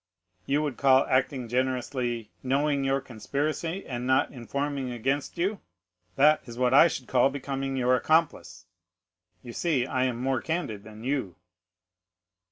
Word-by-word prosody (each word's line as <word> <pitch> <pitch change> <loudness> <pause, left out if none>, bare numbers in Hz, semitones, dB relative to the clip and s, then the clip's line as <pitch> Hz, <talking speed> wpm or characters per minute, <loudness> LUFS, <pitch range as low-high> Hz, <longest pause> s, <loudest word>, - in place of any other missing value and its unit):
"'"You 145 +2 +1
would 145 -5 -3
call 135 -1 +5
acting 130 -1 0
generously, 125 -2 -2
knowing 140 +2 +1
your 135 0 +1
conspiracy 150 - -3
and 125 -1 -4
not 130 0 +2
informing 140 +1 -3
against 135 +6 -2
you, 195 +4 -1 0.6
that 150 +2 +5
is 120 0 -9
what 125 0 +2
I 145 - +8
should 135 -6 -5
call 130 +1 +3
becoming 135 -1 -4
your 125 0 +3
accomplice. 155 - 0 0.8
You 120 - -9
see 145 -6 0
I 130 -1 0
am 120 -2 -2
more 130 0 0
candid 160 - -3
than 110 +1 -12
you." 130 -9 -2
130 Hz, 145 wpm, -27 LUFS, 125-145 Hz, 0.8 s, I